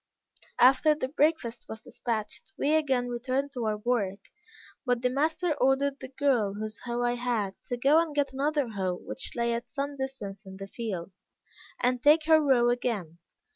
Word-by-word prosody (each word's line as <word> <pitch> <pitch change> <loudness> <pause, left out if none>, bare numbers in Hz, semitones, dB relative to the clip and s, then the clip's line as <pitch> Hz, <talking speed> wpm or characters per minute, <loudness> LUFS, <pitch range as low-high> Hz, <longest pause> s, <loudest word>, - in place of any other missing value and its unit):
After 270 +5 +5
the 260 -4 -3
breakfast 285 -5 0
was 220 - -6
despatched, 230 +6 -5
we 290 +2 +1
again 270 -6 +2
returned 255 +3 -2
to 245 -4 -4
our 215 -1 0
work; 210 -4 -2 0.5
but 245 -2 0
the 250 - +2
master 315 +5 +1
ordered 275 +1 +1
the - - -7
girl, 255 -7 +1
whose 215 +1 -5
hoe 240 -1 -3
I 240 0 +2
had, 240 -5 -1
to 245 - -3
go 285 +6 +5
and 320 -3 -4
get 280 -2 0
another 285 -1 0
hoe 190 -4 -2
which 255 - -7
lay 235 -1 +1
at 235 0 -4
some 280 0 -4
distance 215 -7 -5
in 190 -1 -10
the 195 - -6
field, 195 -4 -5 0.7
and 250 0 +1
take 305 +3 +5
her 315 0 +6
row 255 -5 +4
again. 210 -9 -2
250 Hz, 175 wpm, -28 LUFS, 225-280 Hz, 0.7 s, her